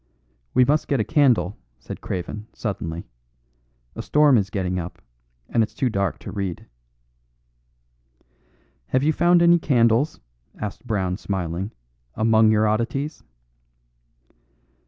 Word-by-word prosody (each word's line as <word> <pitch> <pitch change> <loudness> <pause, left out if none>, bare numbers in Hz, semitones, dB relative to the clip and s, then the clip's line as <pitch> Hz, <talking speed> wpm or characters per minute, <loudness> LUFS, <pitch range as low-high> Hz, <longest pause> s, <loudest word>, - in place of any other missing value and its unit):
"We 125 0 +6
must 150 +4 +1
get 140 - +1
a - - +2
candle," 110 - +2 0.2
said - - -9
Craven, 105 +4 -5
suddenly. 85 -6 -4 0.9
"A - - -4
storm 150 +3 +4
is 100 -4 +1
getting 90 -2 -2
up, 85 0 -7 0.5
and 115 - +1
it's 110 - -2
too 130 -3 0
dark 100 -4 -1
to - - -7
read." 95 -4 -4 2.2
"Have 130 +1 +1
you 155 +2 +3
found 175 +2 +4
any 170 0 +6
candles," 125 0 +2 0.4
asked 105 +4 -6
Brown 95 -5 -1
smiling, 95 -1 -3 0.4
"among 110 0 +4
your 110 0 +3
oddities?" 120 +8 -1
110 Hz, 120 wpm, -23 LUFS, 95-135 Hz, 2.2 s, We